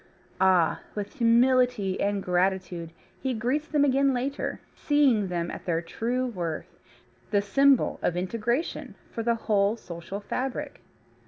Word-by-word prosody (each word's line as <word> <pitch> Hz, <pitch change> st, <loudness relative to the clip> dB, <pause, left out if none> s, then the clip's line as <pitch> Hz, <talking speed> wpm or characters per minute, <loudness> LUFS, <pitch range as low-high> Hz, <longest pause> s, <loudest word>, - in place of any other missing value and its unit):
Ah! 185 Hz, -4 st, +4 dB, 0.2 s
with 205 Hz, -1 st, -4 dB
humility 235 Hz, -4 st, +3 dB
and 200 Hz, -1 st, 0 dB
gratitude 180 Hz, -2 st, 0 dB, 0.3 s
he 265 Hz, -2 st, -1 dB
greets 260 Hz, +8 st, -1 dB
them 295 Hz, -3 st, +2 dB
again 275 Hz, 0 st, +3 dB
later, 270 Hz, +3 st, -3 dB
seeing 270 Hz, -9 st, +2 dB
them 170 Hz, -1 st, -2 dB
at -, -, -8 dB
their 165 Hz, -2 st, +1 dB
true 235 Hz, +9 st, -2 dB
worth, 175 Hz, -10 st, -5 dB, 0.5 s
the 205 Hz, -, +3 dB
symbol 270 Hz, +6 st, +3 dB
of 175 Hz, -, 0 dB
integration 230 Hz, -, -2 dB, 0.2 s
for 230 Hz, -, -4 dB
the 235 Hz, +1 st, +1 dB
whole 210 Hz, -1 st, +1 dB
social 175 Hz, 0 st, -7 dB
fabric. 265 Hz, +6 st, -4 dB
220 Hz, 135 wpm, -27 LUFS, 185-255 Hz, 0.5 s, Ah